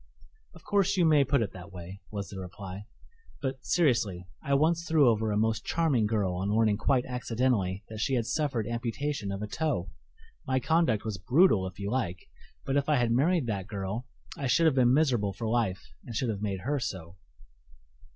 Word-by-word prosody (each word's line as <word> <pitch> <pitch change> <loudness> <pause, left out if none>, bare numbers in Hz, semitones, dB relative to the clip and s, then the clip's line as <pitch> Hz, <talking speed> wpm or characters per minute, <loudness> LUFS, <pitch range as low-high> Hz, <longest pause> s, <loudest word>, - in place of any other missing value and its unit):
"Of - - -15
course 200 -1 +1
you 175 - +4
may 150 -3 +5
put 135 -2 +2
it 100 - -4
that 95 +1 -10
way," 90 +2 -9
was 100 -2 -5
the 95 - -7
reply; 95 +2 -8 0.5
"but, 130 -2 -4
seriously, 115 - +1 0.2
I 140 -2 +1
once 165 +4 +2
threw 160 -5 +4
over 110 -1 +2
a 105 - 0
most 110 +1 +1
charming 145 -10 +1
girl 105 -4 0
on 95 +3 -2
learning 110 -1 +3
quite 130 +2 +1
accidentally 115 -6 -1
that 110 -1 -8
she 130 +4 +1
had 120 -3 0
suffered 130 -6 -1
amputation 120 0 -3
of 100 +2 -4
a - - -3
toe. 125 - -2 0.6
My 130 0 +2
conduct 160 -8 +1
was 105 -3 -3
brutal 120 - +4
if 95 - -10
you 100 0 -4
like, 95 -9 -2 0.4
but 135 +1 +1
if 140 +1 0
I 150 - +4
had 120 -3 +2
married 150 +5 +2
that 100 -4 -3
girl 105 +3 -4 0.3
I 140 - -3
should 165 +7 +3
have 160 - +5
been 125 -2 +4
miserable 125 -9 +2
for 115 +3 -4
life 95 - -1
and 115 - -8
should 120 +2 0
have 105 -2 -3
made 100 -3 -2
her 140 +7 -1
so." 95 -7 -5
115 Hz, 200 wpm, -29 LUFS, 100-140 Hz, 0.6 s, may